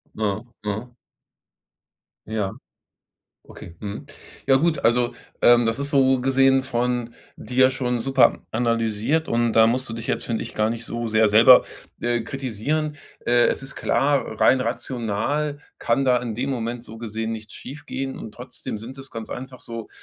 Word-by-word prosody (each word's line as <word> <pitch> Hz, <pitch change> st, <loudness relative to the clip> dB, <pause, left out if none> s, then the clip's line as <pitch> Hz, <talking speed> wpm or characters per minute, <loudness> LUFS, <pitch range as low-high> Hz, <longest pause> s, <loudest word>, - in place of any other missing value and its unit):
Mhm. 105 Hz, +1 st, -2 dB, 0.2 s
Mhm. 110 Hz, +4 st, -4 dB, 1.3 s
Ja. 105 Hz, -3 st, -2 dB, 1.0 s
Okay. 85 Hz, -, -12 dB
Mhm. 105 Hz, +7 st, -6 dB, 0.4 s
Ja 135 Hz, -, +5 dB
gut, 155 Hz, +1 st, +2 dB
also, 120 Hz, +1 st, +2 dB, 0.3 s
ähm, 120 Hz, -1 st, +6 dB
das 115 Hz, +2 st, 0 dB
ist 140 Hz, 0 st, -1 dB
so 135 Hz, -2 st, +4 dB
gesehen 135 Hz, 0 st, +4 dB
von 120 Hz, -2 st, -1 dB, 0.2 s
dir 130 Hz, +3 st, +3 dB
schon 125 Hz, -2 st, -1 dB
super 135 Hz, +2 st, +3 dB
analysiert 115 Hz, +5 st, 0 dB
und 120 Hz, 0 st, +1 dB
da 110 Hz, 0 st, +6 dB
musst 130 Hz, +3 st, 0 dB
du 115 Hz, -, -6 dB
dich 115 Hz, 0 st, -6 dB
jetzt, -, -, -1 dB
finde 115 Hz, -2 st, -2 dB
ich, -, -, -8 dB
gar 110 Hz, +1 st, +1 dB
nicht 115 Hz, 0 st, -5 dB
so 120 Hz, 0 st, -3 dB
sehr 110 Hz, 0 st, +4 dB
selber, 115 Hz, +4 st, +8 dB, 0.4 s
äh, 120 Hz, 0 st, 0 dB
kritisieren. 135 Hz, +5 st, -2 dB, 0.3 s
Äh, 120 Hz, 0 st, +5 dB
es -, -, -1 dB
ist 135 Hz, -, -7 dB
klar, 130 Hz, -3 st, 0 dB
rein 130 Hz, -1 st, +5 dB
rational 130 Hz, +5 st, -2 dB, 0.2 s
kann 135 Hz, +3 st, +1 dB
da 125 Hz, -, +5 dB
in 115 Hz, -3 st, -4 dB
dem 130 Hz, +5 st, -2 dB
Moment 120 Hz, -2 st, -3 dB
so 110 Hz, -, -10 dB
gesehen 110 Hz, 0 st, -4 dB
nichts 110 Hz, -1 st, -8 dB
schiefgehen 135 Hz, -1 st, -6 dB
und 110 Hz, -, -8 dB
trotzdem 125 Hz, -3 st, -7 dB
sind 120 Hz, +5 st, -9 dB
es 135 Hz, 0 st, -10 dB
ganz 115 Hz, -1 st, -7 dB
einfach 130 Hz, 0 st, -7 dB
so 115 Hz, -1 st, -7 dB
120 Hz, 165 wpm, -23 LUFS, 115-135 Hz, 1.3 s, selber